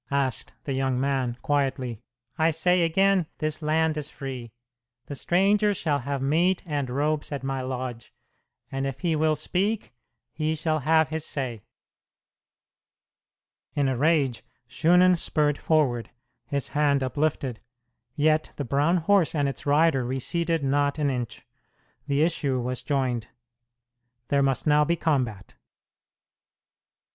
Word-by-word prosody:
asked 140 -3 -1
the 140 - -3
young 130 -1 0
man, 130 -3 0
quietly. 130 -5 -1 0.3
"I 160 +1 +3
say 180 +3 +2
again, 185 +1 +3
this 155 +1 -2
land 155 +1 +1
is 150 -1 -4
free. 130 -5 -7 0.5
The - - -7
stranger 200 +7 +2
shall 150 -5 0
have 140 +1 -3
meat 170 +6 +2
and 145 -5 -2
robes 150 +4 -1
at 140 -2 -4
my 135 -1 -2
lodge, 125 -2 -5 0.6
and 135 0 -2
if 135 -1 -6
he 165 -3 +1
will 155 0 +2
speak, 195 - -1 0.4
he 155 0 -1
shall 155 0 0
have 160 +2 +3
his 160 -1 -3
say." 130 -8 -4 2.1
In 145 -2 +2
a 130 - 0
rage 140 -3 +1 0.2
Shunan 180 +2 +4
spurred 150 -3 +1
forward, 135 -7 +1 0.4
his 140 -1 -2
hand 145 -2 +2
uplifted; 130 -2 -1 0.6
yet 155 +1 +2
the 145 - -4
brown 145 +8 +2
horse 180 0 +2
and 145 -2 +1
its 140 - -5
rider 145 -2 +3
receded 160 +6 -1
not 140 +2 +1
an 145 -2 +1
inch. 120 -3 -5 0.6
The 140 +1 +2
issue 145 -6 0
was 125 +1 -3
joined. 125 -5 -1 1.0
There 140 -1 +3
must 135 -2 +1
now 150 -1 +5
be 170 +3 +1
combat! 130 - -1
145 Hz, 135 wpm, -26 LUFS, 135-160 Hz, 2.1 s, now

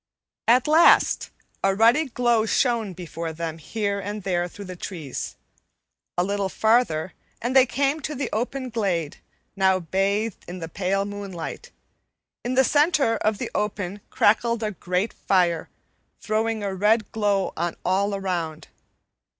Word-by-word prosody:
At 245 +3 +5
last 315 +3 +5 0.3
a 195 0 +3
ruddy 235 +9 +5
glow 240 -3 +1
shone 230 -5 +1
before 170 -1 -5
them 165 0 -5
here 200 +4 -2
and 205 +1 -5
there 175 -2 0
through 200 +3 -10
the 185 -1 -7
trees; 165 -7 -6 0.8
a 175 - +3
little 200 0 -1
farther 220 -7 +2 0.3
and 245 +3 -2
they 265 -1 +7
came 280 +5 0
to 300 +1 -4
the 275 - -2
open 255 +3 -2
glade, 180 -9 -1 0.4
now 190 -1 +3
bathed 195 +5 -1
in 180 - -6
the 165 -2 -5
pale 195 +3 -1
moonlight. 205 - -6 0.7
In 245 +2 -2
the 265 - +6
center 290 -4 +3
of 215 -1 0
the - - -4
open 205 -1 -2
crackled 230 +2 +2
a 215 - -1
great 180 +2 -2
fire, 175 -4 +1 0.5
throwing 220 0 -1
a 200 -1 -2
red 210 +3 +2
glow 205 -3 0
on 170 0 -2
all 200 +2 +1
around. 175 -5 -3
205 Hz, 145 wpm, -24 LUFS, 185-230 Hz, 0.8 s, they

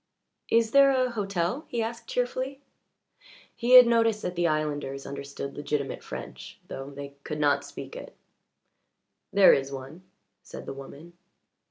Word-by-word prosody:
"Is 230 -1 +3
there 275 +1 +7
a 255 -2 +2
hotel?" 195 - -2
he 235 -1 -2
asked 230 +1 -6
cheerfully. 255 +2 -2 1.0
He 245 +1 +1
had 250 -1 +12
noticed 230 -2 +2
that 180 - -2
the 175 0 +2
islanders 145 -3 -2
understood 140 0 -6
legitimate 145 -1 -3
French, - - -9
though 135 +1 -7
they 140 0 -8
could 150 -1 -5
not 145 -1 +2
speak - - -9
it. - - -9 1.2
"There 195 -1 +7
is 135 0 0
one," 135 +5 -8 0.4
said - - -10
the - - -5
woman. 140 +5 -11
175 Hz, 145 wpm, -27 LUFS, 140-235 Hz, 1.2 s, had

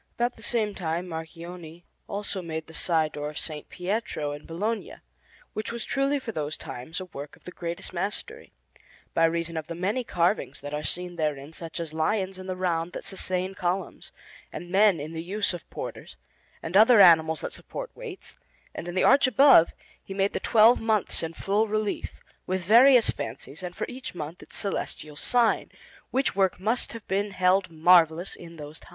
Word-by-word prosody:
About 240 +1 0
the - - -16
same 220 -2 0
time 175 -1 -3
Marchionne 165 0 -8 0.2
also 200 -1 -2
made 160 -2 -5
the 160 - -14
side 160 -2 +1
door 150 0 -4
of 150 - -11
S. 160 - -2 0.2
Pietro 180 -5 -2
in 145 +1 -8
Bologna, 210 +7 -3 0.6
which 215 - -3
was 235 -1 -5
truly 275 +1 +1
for 260 -4 -5
those 155 -5 -3
times 130 +7 -7
a 185 - -6
work 145 -4 -9
of - - -25
the 180 - -8
greatest 170 0 -5
mastery, 210 - -4 0.6
by 165 - +4
reason 170 0 -1
of 155 -1 -4
the 170 - -5
many 200 +9 -1
carvings 175 -1 0
that 145 +1 -7
are 150 - -2
seen 175 +3 -3
therein, 150 -1 -2
such 165 0 -6
as 165 -2 -5
lions 190 +4 0
in 185 - -8
the 185 - -2
round 175 -2 -1
that - - -6
sustain 185 -1 -2
columns, 185 +1 -3 0.4
and 175 0 -8
men 195 -3 +5
in 150 +2 -6
the 160 - -4
use 200 +3 0
of 175 - -8
porters, - - -7 0.5
and 165 +3 -4
other 220 +2 +8
animals 160 -4 +6
that - - -5
support - - -6
weights; 460 -6 -9 0.3
and 170 - -6
in 175 - -5
the 185 - +2
arch 275 0 +6
above 255 - +7 0.3
he 195 - -8
made 195 +1 +1
the - - -1
twelve 225 +1 +5
months 220 -3 +1
in 165 - -3
full 210 +3 +1
relief, 215 -1 -2 0.3
with 185 0 -1
various 240 +4 +7
fancies, 135 +7 -7
and 180 -1 -6
for - - -2
each 255 -5 -7
month 160 +1 -6
its - - -9
celestial 155 -6 -3
sign; 235 +8 +2 0.4
which 265 -4 0
work 190 -2 +2
must 220 +6 0
have 230 -2 -9
been 200 +2 0
held 185 0 +2
marvellous 165 +1 +4
in 170 -1 -11
those 150 0 -8
times. - - -17
180 Hz, 190 wpm, -27 LUFS, 165-210 Hz, 0.6 s, other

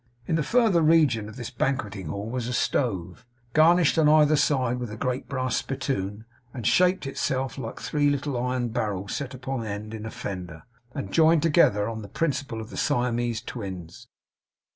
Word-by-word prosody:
In - - -2
the 165 - +1
further 220 - +3
region 150 -10 +3
of 110 - -11
this 125 0 -6
banqueting 115 - -2
hall 100 +7 -4
was 120 0 -3
a 125 - -3
stove, 95 -8 -1 0.3
garnished 165 +1 +5
on 150 -2 +5
either 155 0 +5
side 130 -4 +1
with 120 -2 -4
a 110 - -7
great 125 +1 -2
brass 130 -3 -1
spittoon, 110 -6 -3 0.3
and 120 -4 -5
shaped 180 - +3
in 135 - -3
itself 130 -1 -2
like 115 -4 -6
three 145 -1 +1
little 145 -1 -1
iron 125 0 -1
barrels 100 -3 -2
set 135 -2 -4
up 130 - -14
on 135 -3 -2
end 105 0 -5
in 110 0 -6
a - - -4
fender, 90 -7 -6 0.3
and 95 - -5
joined 160 -1 +5
together 145 -11 +4
on 115 -1 -4
the 100 - -8
principle 140 -4 -2
of 110 - -10
the - - -8
Siamese 120 -4 0
Twins. 95 -2 -7
125 Hz, 185 wpm, -26 LUFS, 110-145 Hz, 0.3 s, garnished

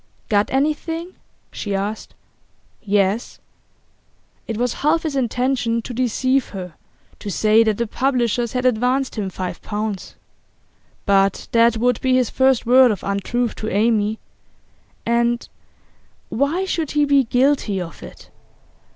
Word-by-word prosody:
'Got 205 -1 +2
anything?' 325 +5 -1 0.4
she 205 -2 -4
asked. 205 +3 -4 0.7
'Yes.' 205 +2 0 1.1
It 225 - -3
was 245 0 0
half 315 +3 +2
his 310 -4 -3
intention 245 -2 0
to 245 - -6
deceive 255 +2 0
her, 180 -4 -7 0.5
to 205 - -6
say 215 +3 +4
that 215 -2 0
the 235 - 0
publishers 240 -1 0
had 250 0 -1
advanced 255 +2 +1
him 205 -4 -3
five 180 -1 -5
pounds. 210 -2 -4 0.9
But 195 -1 +2
that 230 0 +4
would 245 0 +1
be 260 -1 +2
his 255 -3 +1
first 265 -2 +2
word 255 +1 +6
of 205 -5 -2
untruth 225 +5 -1
to 215 - -3
Amy, 215 +1 +1 0.9
and 235 0 +1 0.8
why 295 +9 0
should 330 -5 -2
he 295 - +4
be 280 -2 +3
guilty 245 -5 +1
of 170 -3 -7
it? - - -12
235 Hz, 135 wpm, -20 LUFS, 210-260 Hz, 1.1 s, word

